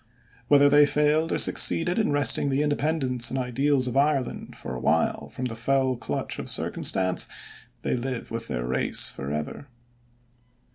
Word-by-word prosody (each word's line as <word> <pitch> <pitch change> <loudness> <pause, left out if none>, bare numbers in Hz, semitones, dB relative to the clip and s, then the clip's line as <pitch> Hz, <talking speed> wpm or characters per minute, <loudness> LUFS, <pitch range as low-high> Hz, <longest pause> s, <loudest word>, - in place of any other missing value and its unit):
Whether 145 -1 +5
they 145 0 +5
failed 150 +2 +1
or - - 0
succeeded 175 +5 +4
in 215 - 0
wresting 145 0 +1
the 135 +2 0
independence 145 -4 0
and 130 - -4
ideals 130 +2 0
of 125 0 -3
Ireland 140 -2 -1
for - - -8
a 65 - -5
while - - 0
from 130 - -6
the 120 - -4
fell 130 +2 0
clutch 120 - -5
of - - -5
circumstance, 95 -1 0 0.6
they - - -1
live 125 -1 -5
with 115 0 -5
their - - -4
race 65 +1 +1
forever. 75 - -6
135 Hz, 155 wpm, -25 LUFS, 120-145 Hz, 0.6 s, Whether